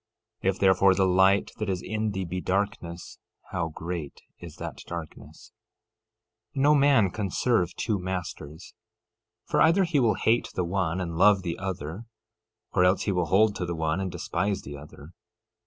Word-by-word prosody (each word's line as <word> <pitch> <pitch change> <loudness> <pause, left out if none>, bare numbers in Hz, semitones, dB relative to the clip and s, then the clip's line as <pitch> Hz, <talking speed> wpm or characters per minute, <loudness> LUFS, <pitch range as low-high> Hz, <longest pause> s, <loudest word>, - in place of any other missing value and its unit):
If, 95 0 0
therefore, 95 0 +4
the 95 0 +3
light 95 +2 +3
that 105 -2 -2
is 90 -2 -2
in 110 0 -2
thee 95 -2 -3
be 90 +2 -4
darkness, 90 -3 -3 0.3
how 85 -3 -1
great 80 -2 -6 0.2
is - - -10
that - - -7
darkness! 85 -2 -9 1.0
13:24 135 - -1
No 150 +1 +6
man 140 -9 +4
can 100 -1 -3
serve 95 -4 +1
two 105 -3 -1
masters; 90 -3 -6 0.7
for - - +1
either 170 +5 +5
he 170 -5 +1
will 115 -4 +3
hate 115 +2 +1
the 90 - 0
one 90 -1 -1
and 85 -3 -4
love 100 -1 +5
the 85 -3 -4
other, 95 +1 -5 0.7
or 90 - +3
else 90 +1 +3
he 100 - 0
will 90 -3 0
hold 100 +4 +3
to 90 - -2
the 85 - -3
one 80 +1 -1
and 95 -1 -3
despise 100 +4 -2
the 70 - -8
other. 75 +2 -12
95 Hz, 170 wpm, -26 LUFS, 85-105 Hz, 1.0 s, No